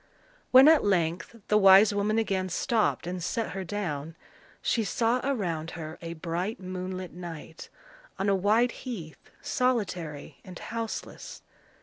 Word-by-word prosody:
When 260 Hz, +2 st, +8 dB
at 320 Hz, -1 st, +6 dB
length 175 Hz, 0 st, 0 dB
the 210 Hz, -, +4 dB
wise 195 Hz, +1 st, +7 dB
woman 205 Hz, +2 st, 0 dB
again 195 Hz, -4 st, 0 dB
stopped 220 Hz, +3 st, 0 dB
and 180 Hz, 0 st, -4 dB
set 225 Hz, +5 st, -2 dB
her 195 Hz, -, -4 dB
down, 165 Hz, -5 st, -4 dB, 0.4 s
she 230 Hz, -, 0 dB
saw 230 Hz, +4 st, +1 dB
around 175 Hz, -, -2 dB
her 160 Hz, -1 st, -7 dB
a 170 Hz, 0 st, -5 dB
bright 175 Hz, +6 st, -3 dB
moonlit 185 Hz, 0 st, -6 dB
night, 165 Hz, -2 st, -9 dB, 0.5 s
on 195 Hz, -, -1 dB
a 200 Hz, -, +4 dB
wide 215 Hz, +6 st, +3 dB
heath, 200 Hz, -, -8 dB
solitary 190 Hz, -, -2 dB
and 185 Hz, -2 st, -10 dB
houseless. 230 Hz, -1 st, -6 dB
190 Hz, 135 wpm, -28 LUFS, 170-225 Hz, 0.5 s, When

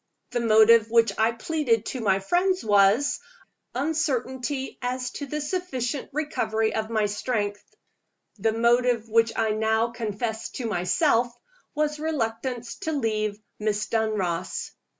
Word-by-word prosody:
The 245 Hz, -, 0 dB
motive 225 Hz, 0 st, +6 dB
which 230 Hz, 0 st, +4 dB
I 220 Hz, +1 st, +4 dB
pleaded 230 Hz, -2 st, 0 dB
to 255 Hz, -, -4 dB
my 195 Hz, -3 st, +3 dB
friends 360 Hz, -, +1 dB
was 205 Hz, +6 st, +4 dB, 0.6 s
uncertainty 265 Hz, -2 st, -2 dB
as 250 Hz, 0 st, -2 dB
to 285 Hz, -, -6 dB
the 300 Hz, +3 st, -3 dB
sufficient 290 Hz, -5 st, -3 dB
recovery 225 Hz, -7 st, -1 dB
of 220 Hz, 0 st, -2 dB
my 215 Hz, -2 st, +1 dB
strength. 205 Hz, -1 st, -2 dB, 0.8 s
The 220 Hz, +3 st, +2 dB
motive 235 Hz, 0 st, +2 dB
which 225 Hz, +1 st, +3 dB
I 220 Hz, -1 st, +1 dB
now 220 Hz, +2 st, +1 dB
confessed 220 Hz, -1 st, -4 dB
to 250 Hz, -, -4 dB
myself 230 Hz, -, +2 dB, 0.4 s
was 300 Hz, 0 st, 0 dB
reluctance 245 Hz, -5 st, -3 dB
to 320 Hz, -5 st, -3 dB
leave 215 Hz, -6 st, -1 dB, 0.2 s
Miss 210 Hz, 0 st, 0 dB
Dunross. 200 Hz, -6 st, -1 dB
230 Hz, 130 wpm, -25 LUFS, 220-265 Hz, 0.8 s, motive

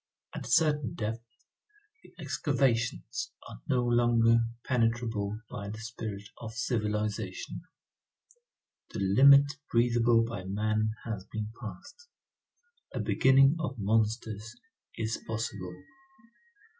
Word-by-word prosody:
At -, -, -6 dB
a -, -, -7 dB
certain 150 Hz, -7 st, +2 dB
depth, 110 Hz, +1 st, -3 dB, 0.8 s
the -, -, -18 dB
excavations 120 Hz, -4 st, -1 dB, 0.2 s
are -, -, -11 dB
no 125 Hz, -1 st, +2 dB
longer 115 Hz, -1 st, +4 dB, 0.2 s
penetrable 115 Hz, -4 st, 0 dB
by 100 Hz, -2 st, -6 dB
the 105 Hz, -, -6 dB
spirit 110 Hz, -3 st, -6 dB
of 110 Hz, -1 st, -7 dB
civilization, 105 Hz, -3 st, -2 dB, 1.3 s
the -, -, -6 dB
limit 140 Hz, +8 st, +6 dB
breathable 120 Hz, -1 st, +4 dB
by 115 Hz, -5 st, -5 dB
man 110 Hz, +3 st, 0 dB
has 110 Hz, -5 st, -4 dB
been 110 Hz, 0 st, -5 dB
passed; 110 Hz, -, -10 dB, 0.8 s
a -, -, -4 dB
beginning 135 Hz, +3 st, +4 dB
of 135 Hz, -5 st, -3 dB
monsters 110 Hz, +1 st, -1 dB, 0.4 s
is 110 Hz, 0 st, -2 dB
possible. 100 Hz, -5 st, -5 dB
115 Hz, 105 wpm, -30 LUFS, 105-120 Hz, 1.3 s, limit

